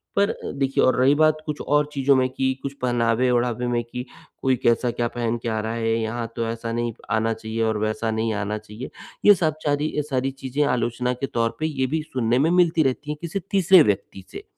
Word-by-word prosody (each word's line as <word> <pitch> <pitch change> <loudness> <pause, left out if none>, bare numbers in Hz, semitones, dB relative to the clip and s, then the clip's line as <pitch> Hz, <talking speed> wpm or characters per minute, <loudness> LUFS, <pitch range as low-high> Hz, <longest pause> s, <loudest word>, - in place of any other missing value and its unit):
पर 200 +1 +2 0.3
देखिए 135 0 +2
और 130 - +4
रही 135 +3 +5
बात 155 0 +4
कुछ 150 -1 -4
और 150 0 +2
चीज़ों 140 0 +3
में 130 0 +3
कि 130 0 0
कुछ 140 0 -4
पहनावे-ओढ़ावे 120 0 +1
में 120 -1 0
कि, 125 +2 -7 0.4
"कोई 130 -1 +2
कैसा 120 +1 +2
क्या 120 0 -1
पहन 120 -1 -1
के 115 - -1
आ 110 -1 -1
रहा 110 +1 -3
है, 115 -1 0
यहाँ 115 +1 -3
तो 115 -1 -1
ऐसा 115 0 -4
नहीं 120 -1 -2 0.2
आना 115 0 +1
चाहिए 110 +1 -5
और 110 -1 +1
वैसा 110 +1 -1
नहीं 110 0 -1
आना 105 +1 -2
चाहिए।" 105 +4 -9 0.4
ये 205 -1 +9
सब 160 -4 0
चारी 145 +1 0
अ, - - +2
सारी 135 0 0
चीज़ें 135 +2 -2
आलोचना 125 +1 -1
के 125 - -3
तौर 115 -1 -1
पे 155 - -1
ये 135 -4 -1
भी 155 +3 -1
सुनने 125 -5 0
में 155 +4 +3
मिलती 170 -3 +3
रहती 140 +3 -1
हैं, 150 - -4
किसी 170 +4 -3
तीसरे 190 -2 +6
व्यक्ति 95 -3 -2
से। - - -8
125 Hz, 220 wpm, -23 LUFS, 115-145 Hz, 0.4 s, ये